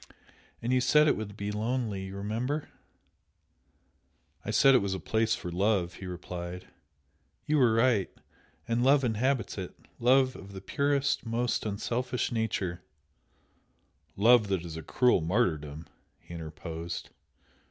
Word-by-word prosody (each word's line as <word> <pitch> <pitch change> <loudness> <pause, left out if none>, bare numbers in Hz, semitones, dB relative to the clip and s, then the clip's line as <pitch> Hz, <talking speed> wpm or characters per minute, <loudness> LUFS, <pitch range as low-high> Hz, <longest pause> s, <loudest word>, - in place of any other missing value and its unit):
And 120 +2 0
you 130 - +3
said 150 +4 +5
it - - +4
would 105 -1 -6
be 100 0 -3
lonely! 110 -2 -2
you 95 +1 -8
remember?" 115 +9 -3 1.7
"I - - -6
said 135 - +5
it 130 - +6
was 100 -1 -2
a - - -4
place 110 +5 +1
for 90 - -6
love!" 95 -1 +1
he 95 - -6
replied. 90 0 -6 0.8
"You 150 0 +2
were 120 -4 +4
right! 115 -4 +3 0.6
And 115 +1 +1
love 135 +1 +5
inhabits 120 -1 0
it 90 - -6 0.2
love 130 +2 +4
of 100 0 -11
the 95 - -6
purest, 140 +5 0
most 120 0 -1
unselfish 120 +4 -2
nature 95 -6 -2 0.7
" - - -41
"Love 120 -3 +7
that 95 -3 -1
is 80 -2 -7
a 80 - -5
cruel 125 - +2
martyrdom!" 80 -5 -1 0.3
he - - -13
interposed. 80 +1 -6
110 Hz, 140 wpm, -29 LUFS, 90-125 Hz, 1.7 s, Love